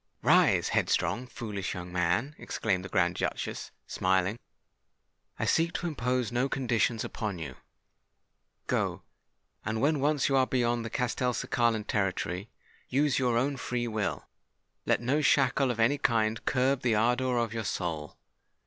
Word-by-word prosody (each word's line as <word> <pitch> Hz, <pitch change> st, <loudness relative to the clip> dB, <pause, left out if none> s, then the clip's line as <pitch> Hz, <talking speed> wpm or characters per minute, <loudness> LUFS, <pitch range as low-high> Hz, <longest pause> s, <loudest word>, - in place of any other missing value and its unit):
"Rise, -, -, +4 dB
headstrong—foolish 110 Hz, -5 st, -1 dB
young 90 Hz, 0 st, -7 dB
man," 90 Hz, -, +1 dB
exclaimed 95 Hz, -4 st, -1 dB
the 95 Hz, -, -7 dB
Grand 90 Hz, -1 st, +2 dB
Duchess, -, -, -3 dB, 0.2 s
smiling. 95 Hz, +4 st, 0 dB, 1.0 s
"I -, -, -1 dB
seek 165 Hz, +1 st, +2 dB
to -, -, -3 dB
impose 125 Hz, -6 st, -1 dB
no 125 Hz, +3 st, +1 dB
conditions 120 Hz, -3 st, 0 dB
upon 105 Hz, -4 st, -4 dB
you. 75 Hz, -6 st, -6 dB, 1.1 s
Go; -, -, -1 dB, 0.6 s
and 110 Hz, 0 st, -2 dB
when 145 Hz, +4 st, +2 dB
once 145 Hz, 0 st, +2 dB
you 135 Hz, -, +1 dB
are 130 Hz, -1 st, +4 dB
beyond 120 Hz, -2 st, +1 dB
the 115 Hz, -, -4 dB
Castelcicalan 120 Hz, -2 st, 0 dB
territory, 95 Hz, 0 st, -1 dB, 0.4 s
use 140 Hz, +1 st, +2 dB
your 125 Hz, -3 st, +2 dB
own 135 Hz, +3 st, 0 dB
free 125 Hz, -1 st, -2 dB
will—let 110 Hz, +1 st, -4 dB
no 135 Hz, +6 st, +1 dB
shackle 135 Hz, -2 st, +3 dB
of 120 Hz, -2 st, -2 dB
any 135 Hz, +6 st, +3 dB
kind 110 Hz, -3 st, +1 dB
curb 130 Hz, 0 st, +2 dB
the 120 Hz, -3 st, +2 dB
ardour 125 Hz, +3 st, +2 dB
of 115 Hz, -2 st, 0 dB
your 115 Hz, -1 st, -3 dB
soul. 80 Hz, -6 st, -3 dB
120 Hz, 140 wpm, -29 LUFS, 105-130 Hz, 1.1 s, Rise